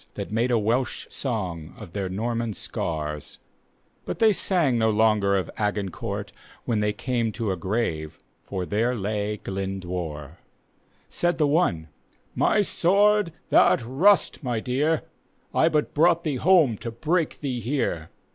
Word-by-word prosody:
That -, -, -5 dB
made 115 Hz, +3 st, +1 dB
a 120 Hz, -, +3 dB
Welsh 115 Hz, +4 st, 0 dB
song 90 Hz, -, -4 dB
of 85 Hz, -, -11 dB
their 100 Hz, -2 st, -2 dB
Norman 115 Hz, +2 st, -2 dB
scars, 75 Hz, -3 st, -4 dB, 0.7 s
But -, -, -4 dB
they 220 Hz, -2 st, +5 dB
sang 165 Hz, -11 st, +1 dB
no 110 Hz, 0 st, +3 dB
longer 105 Hz, -2 st, +3 dB
of 90 Hz, -4 st, -3 dB
Agincourt, 105 Hz, -4 st, -3 dB, 0.3 s
When 115 Hz, -3 st, 0 dB
they 105 Hz, 0 st, +1 dB
came 115 Hz, +1 st, -1 dB
to 115 Hz, -4 st, -2 dB
a -, -, -1 dB
grave, 85 Hz, -5 st, -2 dB, 0.3 s
for 95 Hz, -2 st, -4 dB
there 115 Hz, +6 st, 0 dB
lay 105 Hz, 0 st, -2 dB
Glyndwr. 90 Hz, -6 st, -5 dB, 0.7 s
Said 175 Hz, -1 st, 0 dB
the 155 Hz, -, +3 dB
one, 140 Hz, -, +1 dB, 0.2 s
" -, -, -38 dB
My 210 Hz, -, +4 dB
sword, 205 Hz, +1 st, +3 dB, 0.2 s
th'art -, -, +5 dB
rust, 165 Hz, -, +3 dB
my 120 Hz, -3 st, -1 dB
dear, 145 Hz, +7 st, 0 dB, 0.5 s
I 160 Hz, -, +4 dB
but 150 Hz, -2 st, 0 dB
brought 170 Hz, +2 st, +3 dB
thee 150 Hz, -5 st, -1 dB
home 155 Hz, -, +4 dB
to 115 Hz, -, -5 dB
break 155 Hz, +8 st, -1 dB
thee 130 Hz, -4 st, -2 dB
here." 115 Hz, -, -2 dB
115 Hz, 145 wpm, -25 LUFS, 95-150 Hz, 0.7 s, they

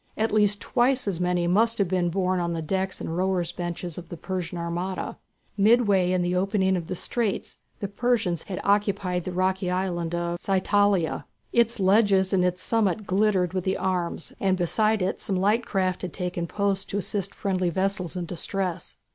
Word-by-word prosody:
At 220 Hz, +1 st, +1 dB
least 205 Hz, -1 st, +3 dB
twice 250 Hz, 0 st, +1 dB
as 185 Hz, -4 st, -1 dB
many 180 Hz, -1 st, +1 dB
must 225 Hz, +6 st, +3 dB
have 200 Hz, -, +2 dB
been 180 Hz, -1 st, +1 dB
borne 185 Hz, +1 st, 0 dB
on 170 Hz, -1 st, -1 dB
the 165 Hz, -, -2 dB
decks 190 Hz, +3 st, -2 dB
and 160 Hz, -, -4 dB
rowers' 180 Hz, -2 st, 0 dB
benches 175 Hz, -1 st, -5 dB
of 175 Hz, -, -12 dB
the 170 Hz, -, -7 dB
Persian 180 Hz, 0 st, -4 dB
armada. 175 Hz, +2 st, -3 dB, 0.4 s
Midway 205 Hz, -4 st, +4 dB
in 180 Hz, -1 st, +1 dB
the 175 Hz, +1 st, 0 dB
opening 190 Hz, 0 st, +2 dB
of 170 Hz, -3 st, -3 dB
the 185 Hz, -, -3 dB
straits 220 Hz, +2 st, -2 dB, 0.2 s
the 200 Hz, -, -1 dB
Persians 200 Hz, -5 st, 0 dB
had 185 Hz, -, -5 dB
occupied 200 Hz, -3 st, +1 dB
the 185 Hz, -, -3 dB
rocky 185 Hz, +1 st, 0 dB
island 175 Hz, -2 st, -1 dB
of 170 Hz, 0 st, -2 dB
Psytalia. 195 Hz, -2 st, +1 dB, 0.3 s
Its 235 Hz, -1 st, +3 dB
ledges 195 Hz, -1 st, +4 dB
and 185 Hz, -2 st, +3 dB
its 180 Hz, 0 st, 0 dB
summit 215 Hz, -2 st, +1 dB
glittered 190 Hz, -2 st, +2 dB
with 185 Hz, 0 st, -1 dB
arms, 180 Hz, -3 st, -2 dB
and 190 Hz, -1 st, +2 dB
beside 215 Hz, +4 st, +2 dB
it 185 Hz, -, -2 dB
some 195 Hz, -, -1 dB
light 210 Hz, +6 st, +2 dB
craft 185 Hz, -2 st, 0 dB
had 180 Hz, -3 st, -5 dB
taken 180 Hz, -2 st, -3 dB
post 200 Hz, +1 st, -1 dB
to 200 Hz, -, -2 dB
assist 200 Hz, -1 st, -3 dB
friendly 185 Hz, -2 st, 0 dB
vessels 190 Hz, 0 st, -1 dB
in 180 Hz, -1 st, -3 dB
distress. 180 Hz, +1 st, -3 dB
185 Hz, 180 wpm, -26 LUFS, 180-200 Hz, 0.4 s, Midway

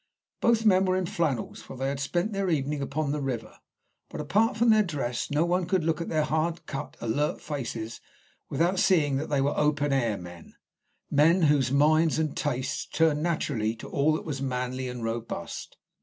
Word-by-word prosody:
Both 230 Hz, -1 st, +2 dB
men 190 Hz, -2 st, +5 dB
were 185 Hz, 0 st, +2 dB
in 185 Hz, -, 0 dB
flannels, 165 Hz, -, -2 dB
for 135 Hz, -, -10 dB
they 135 Hz, +1 st, -1 dB
had 140 Hz, 0 st, -3 dB
spent 175 Hz, +9 st, -1 dB
their 195 Hz, -1 st, 0 dB
evening 145 Hz, -2 st, 0 dB
upon 140 Hz, +1 st, -2 dB
the 150 Hz, 0 st, -2 dB
river, 125 Hz, -4 st, -4 dB, 0.5 s
but -, -, -7 dB
apart 215 Hz, -, +1 dB
from 235 Hz, 0 st, +5 dB
their 215 Hz, 0 st, +6 dB
dress 145 Hz, -, -2 dB
no 150 Hz, +3 st, +2 dB
one 175 Hz, 0 st, 0 dB
could 185 Hz, -2 st, +1 dB
look 165 Hz, +1 st, 0 dB
at 170 Hz, -, -4 dB
their 155 Hz, -2 st, +1 dB
hard 160 Hz, +3 st, -1 dB
cut, 135 Hz, -, -6 dB
alert 140 Hz, +6 st, 0 dB
faces 120 Hz, -6 st, -5 dB, 0.5 s
without 170 Hz, +6 st, +1 dB
seeing 160 Hz, -9 st, +3 dB
that 150 Hz, -, -3 dB
they 145 Hz, -2 st, +2 dB
were 140 Hz, +2 st, +1 dB
open 145 Hz, -1 st, +1 dB
air 120 Hz, -6 st, +1 dB
men 90 Hz, -2 st, -11 dB, 0.6 s
men 165 Hz, +5 st, +4 dB
whose 145 Hz, -4 st, +3 dB
minds 155 Hz, +3 st, +4 dB
and 155 Hz, -2 st, -1 dB
tastes 135 Hz, -1 st, -2 dB
turned 160 Hz, -2 st, +2 dB
naturally 140 Hz, -10 st, -1 dB
to -, -, -10 dB
all 145 Hz, +2 st, +2 dB
that 155 Hz, -, -3 dB
was 140 Hz, -4 st, -4 dB
manly 130 Hz, -1 st, -2 dB
and 125 Hz, -1 st, -6 dB
robust. 115 Hz, -6 st, -5 dB
150 Hz, 190 wpm, -27 LUFS, 135-170 Hz, 0.6 s, their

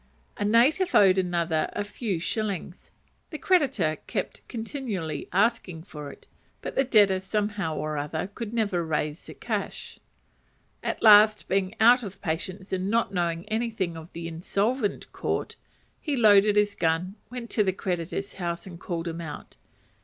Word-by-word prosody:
A -, -, -3 dB
native 250 Hz, -, +3 dB
owed 190 Hz, -2 st, +6 dB
another 170 Hz, -3 st, 0 dB
a 205 Hz, -, -2 dB
few 205 Hz, -2 st, -3 dB
shillings; 195 Hz, 0 st, -4 dB, 0.4 s
the 310 Hz, -, -6 dB
creditor 265 Hz, -, +2 dB
kept -, -, -3 dB
continually 220 Hz, -, -4 dB
asking 195 Hz, -4 st, +1 dB
for 150 Hz, -6 st, -8 dB
it; -, -, -16 dB, 0.4 s
but -, -, -4 dB
the 270 Hz, -, +3 dB
debtor, 205 Hz, -7 st, +4 dB
somehow 205 Hz, -4 st, -2 dB
or 155 Hz, -1 st, -2 dB
other, 150 Hz, +4 st, -3 dB, 0.2 s
never 220 Hz, -3 st, 0 dB
could 165 Hz, -, -6 dB
raise 150 Hz, 0 st, -2 dB
the -, -, -10 dB
cash. -, -, -4 dB, 0.8 s
At -, -, -3 dB
last 215 Hz, 0 st, +7 dB
being 195 Hz, +1 st, 0 dB
out 240 Hz, +3 st, +7 dB
of 195 Hz, -3 st, -8 dB
patience, 185 Hz, +3 st, -4 dB
and 190 Hz, +1 st, -1 dB
not 230 Hz, -2 st, +1 dB
knowing 170 Hz, 0 st, -1 dB
anything 220 Hz, -6 st, -1 dB
of 160 Hz, +1 st, -10 dB
the 165 Hz, 0 st, -5 dB
Insolvent 200 Hz, +7 st, -1 dB
Court, -, -, -2 dB, 0.4 s
he 295 Hz, -3 st, -2 dB
loaded 210 Hz, -3 st, +6 dB
his 210 Hz, -1 st, +3 dB
gun, 165 Hz, +3 st, 0 dB, 0.2 s
went 245 Hz, -1 st, -7 dB
to 215 Hz, -, +3 dB
the 190 Hz, -, +1 dB
creditor's 180 Hz, +1 st, -3 dB
house, 170 Hz, -2 st, -4 dB
and 175 Hz, -3 st, -10 dB
called 170 Hz, -1 st, -4 dB
him 165 Hz, 0 st, -4 dB
out. 150 Hz, -3 st, -8 dB
195 Hz, 155 wpm, -26 LUFS, 170-220 Hz, 0.8 s, last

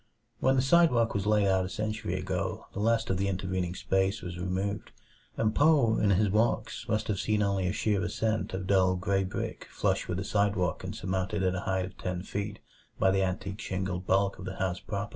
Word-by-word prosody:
When 130 Hz, 0 st, +3 dB
the 130 Hz, -, +3 dB
sidewalk 135 Hz, -6 st, +4 dB
was 100 Hz, 0 st, -1 dB
laid 105 Hz, -1 st, +4 dB
out 95 Hz, -1 st, +3 dB
a 95 Hz, -, -4 dB
century 110 Hz, 0 st, -3 dB
ago -, -, -3 dB
the -, -, -5 dB
last 115 Hz, -1 st, +2 dB
of 95 Hz, -, +1 dB
the 100 Hz, +1 st, 0 dB
intervening 95 Hz, -2 st, -2 dB
space 95 Hz, +3 st, 0 dB
was 90 Hz, -1 st, -6 dB
removed; 95 Hz, +3 st, -2 dB, 0.5 s
and 110 Hz, -1 st, +1 dB
Poe 145 Hz, -7 st, +4 dB
in 105 Hz, -, +3 dB
his 100 Hz, +1 st, +3 dB
walks 110 Hz, +1 st, 0 dB
must 110 Hz, -1 st, 0 dB
have 100 Hz, -3 st, -1 dB
seen 105 Hz, -1 st, +1 dB
only 100 Hz, -2 st, 0 dB
a -, -, +1 dB
sheer 105 Hz, -1 st, 0 dB
ascent 110 Hz, 0 st, -1 dB
of 95 Hz, 0 st, -4 dB
dull 95 Hz, -1 st, +3 dB
gray 95 Hz, +1 st, 0 dB
brick 95 Hz, -, -5 dB
flush -, -, 0 dB
with 90 Hz, -, -2 dB
the 95 Hz, -, -2 dB
sidewalk 100 Hz, -3 st, 0 dB
and -, -, -5 dB
surmounted 95 Hz, +2 st, -2 dB
at 90 Hz, -1 st, +2 dB
a 90 Hz, -, -2 dB
height 95 Hz, -1 st, +1 dB
of 95 Hz, -, -12 dB
ten 90 Hz, -1 st, -3 dB
feet 100 Hz, +1 st, -4 dB, 0.4 s
by 95 Hz, -, +3 dB
the 95 Hz, 0 st, +2 dB
antique 95 Hz, +2 st, -2 dB
shingled 95 Hz, -2 st, -3 dB
bulk 95 Hz, 0 st, +2 dB
of 90 Hz, -, -7 dB
the 95 Hz, 0 st, -5 dB
house 95 Hz, -2 st, -1 dB
proper. 100 Hz, +1 st, -4 dB
100 Hz, 215 wpm, -29 LUFS, 95-110 Hz, 0.5 s, sidewalk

